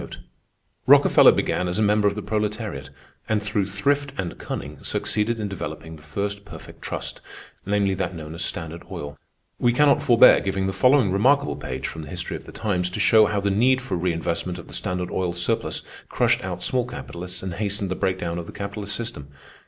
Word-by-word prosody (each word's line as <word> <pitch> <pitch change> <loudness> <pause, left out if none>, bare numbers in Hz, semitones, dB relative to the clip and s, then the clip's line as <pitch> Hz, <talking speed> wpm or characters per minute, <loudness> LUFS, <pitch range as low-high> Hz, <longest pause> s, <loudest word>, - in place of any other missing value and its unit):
Rockefeller - - +7
began 90 - 0
as 90 - -2
a - - +1
member 105 0 +3
of 100 - 0
the 105 - -5
proletariat, 105 - -3 0.4
and 110 -1 +2
through 105 -2 -1
thrift 140 +9 0
and 90 -2 -3
cunning - - -6
succeeded 110 +2 -1
in 105 - -2
developing 85 -4 -6
the 75 - -15
first 100 +6 -4
perfect 100 - -12
trust, - - -5 0.5
namely 100 -1 +2
that 95 -1 -3
known 80 -1 -7
as 85 - -3
Standard 80 0 -4
Oil. 75 0 -6 0.4
We 120 -1 +3
cannot 145 +2 +4
forbear 120 -5 +7
giving 95 -1 -1
the 95 - -1
following 125 -5 +4
remarkable 140 +9 +3
page 65 +1 -5
from 80 - -7
the 75 - -9
history 90 -2 -4
of - - -9
the - - -10
times, 90 -4 -1
to 90 - -5
show 110 -1 +6
how 100 -1 -1
the 100 0 +1
need 125 +6 +3
for 125 -7 -3
reinvestment 85 0 -1
of 85 - -10
the - - -13
Standard 90 0 -2
Oil 90 -2 -1
surplus 85 0 -1 0.3
crushed - - +2
out 90 -2 -4
small 125 -1 +1
capitalists 90 -7 -7
and 95 -2 -4
hastened 100 0 -2
the - - 0
breakdown 90 -3 -1
of 85 - -7
the - - -8
capitalist 100 +1 -4
system. 115 -12 -5
100 Hz, 195 wpm, -24 LUFS, 90-105 Hz, 0.5 s, Rockefeller